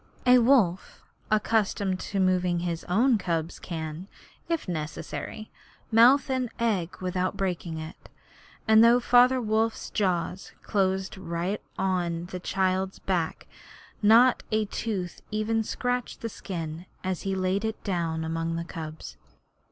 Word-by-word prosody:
A 250 0 +7
wolf 230 -8 +2 0.3
accustomed 210 -3 +1
to 195 - -3
moving 180 -2 +2
his 170 -1 -3
own 225 +6 +3
cubs 165 -3 -2
can, 160 +1 -6 0.4
if 335 -8 -1
necessary, 165 +5 -5 0.4
mouth 240 +5 +6
an 255 -2 0
egg 185 -6 -1
without 185 +1 -1
breaking 175 -4 -2
it, 155 0 -9 0.6
and 220 0 +7
though 235 +1 +6
Father 250 +1 +5
Wolf's 220 -1 -1
jaws 185 -1 -1
closed 190 -1 0
right 175 +3 -3 0.2
on 175 -3 -1
the 180 - -4
child's 190 +1 0
back 175 -4 -2 0.6
not 230 +4 +6
a 215 0 +2
tooth 195 -4 -4
even 215 +1 0
scratched 245 +2 -3
the 230 - -3
skin, 170 -4 -6 0.2
as 185 -2 -2
he 195 -1 -2
laid 190 +2 0
it 220 -1 -3
down 165 -4 -1
among 165 +1 -2
the 170 0 -3
cubs. 160 -2 -8
190 Hz, 130 wpm, -27 LUFS, 170-220 Hz, 0.6 s, A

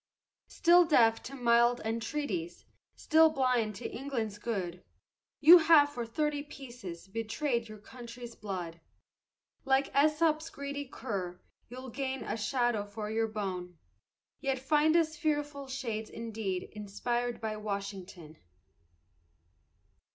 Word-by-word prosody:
Still 355 0 +5
deaf 230 -9 +4
to 275 - -8
mild 240 -1 +3
entreaties, 220 - -3 0.3
still 320 0 +5
blind 250 -7 +1
to - - -5
England's 230 -6 -4
good, 185 -6 -4 0.6
You 335 +4 +10
have 315 -3 +6
for 240 -3 -4
thirty 295 +4 -1
pieces 240 - -9
betrayed 230 +3 -2
your 215 - -9
country's 235 +2 -10
blood. 175 -5 -6 0.8
Like 270 0 +1
Esop's 310 +2 +3
greedy 280 -1 -5
cur 195 -8 -5 0.3
you'll 255 +1 -8
gain 265 +1 -3
a - - -3
shadow 235 0 0
for 210 +1 -6
your 225 0 +1
bone, 185 -5 -5 0.6
Yet 270 -1 -1
find 300 +4 +2
us 320 -2 +2
fearful 295 -3 -2
shades 235 -5 -4
indeed 220 -5 -4
inspired 240 +4 -3
by 220 -1 -3
Washington. 195 -6 -6
235 Hz, 115 wpm, -31 LUFS, 210-280 Hz, 0.8 s, You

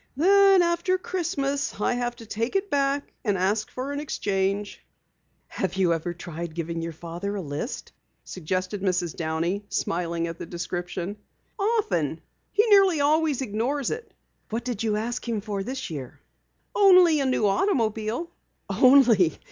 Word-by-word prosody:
"Then 390 +3 +6
after 340 +2 +1
Christmas 290 - -2
I 210 - +1
have 240 0 -2
to 235 -2 -12
take 230 - -3
it 390 0 0
back 280 0 0
and 205 -4 +1
ask 205 +4 0
for 260 +2 -5
an 285 - -3
exchange." 200 -7 -2 0.6
"Have 190 -1 -3
you 185 -3 +3
ever 165 +1 -2
tried 170 -1 -7
giving 170 0 -3
your 165 0 -4
father 170 +5 -5
a 200 - -3
list?" 145 - -5 0.3
suggested 185 +3 -3
Mrs. 180 -4 0
Downey, 165 +5 -2
smiling 170 -1 -1
at 165 0 -6
the - - -6
description. 175 +2 -4 0.4
"Often. 190 - 0 0.3
He 420 +2 +3
nearly 390 -7 +5
always 295 -1 +2
ignores 245 +5 -1
it." 460 +1 -6 0.4
"What 230 +2 -3
did 245 -5 -3
you 220 -2 +1
ask 235 +3 -3
him 225 -2 0
for 205 -1 -4
this 260 0 -5
year?" 135 -5 -7 0.5
"Only 365 -6 +6
a 275 - +1
new 255 -4 +1
automobile." 225 - 0 0.4
"Only! 245 - +5
215 Hz, 150 wpm, -25 LUFS, 180-285 Hz, 0.6 s, Then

